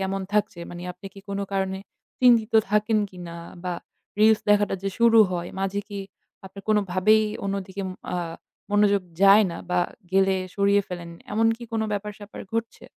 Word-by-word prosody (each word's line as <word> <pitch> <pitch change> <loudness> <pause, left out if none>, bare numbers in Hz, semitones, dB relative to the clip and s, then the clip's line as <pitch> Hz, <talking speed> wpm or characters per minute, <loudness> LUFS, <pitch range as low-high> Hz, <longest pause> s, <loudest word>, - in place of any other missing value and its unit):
কেমন 195 0 -2
থাকছে? 210 -4 0
মানে 175 0 -8
আপনি 195 - -12
কি 195 - -11
কোনো 200 0 -2
কারণে 190 0 -1 0.4
চিন্তিত 235 -2 +5 0.2
থাকেন 210 +1 +2
কিনা? 175 -2 -9 0.3
বা 180 -1 -2 0.5
reels 220 0 +6
দেখাটা 205 -1 +3
যে 195 - -1
শুরু 230 -1 +6
হয় 175 -1 -3
মাঝে 195 +1 -1
কি 205 -1 -6 0.5
আপনার 195 +1 -11
কোনোভাবেই 210 +1 +3 0.2
অন্যদিকে 195 0 -3 0.3
আ - - 0 0.5
মনোযোগ 205 -1 +3 0.2
যায় 200 +2 +8
না 170 - -6
বা 180 0 +2 0.3
গেলে 195 0 +3 0.2
সরিয়ে 200 0 +3
ফেলেন, 175 -2 -6 0.2
এমন 225 +2 +3
কি 240 - -9
কোনো 220 -1 0
ব্যাপার 205 +1 -3
স্যাপার 205 0 -10
ঘটছে? 230 0 -3
200 Hz, 160 wpm, -25 LUFS, 190-210 Hz, 0.5 s, যায়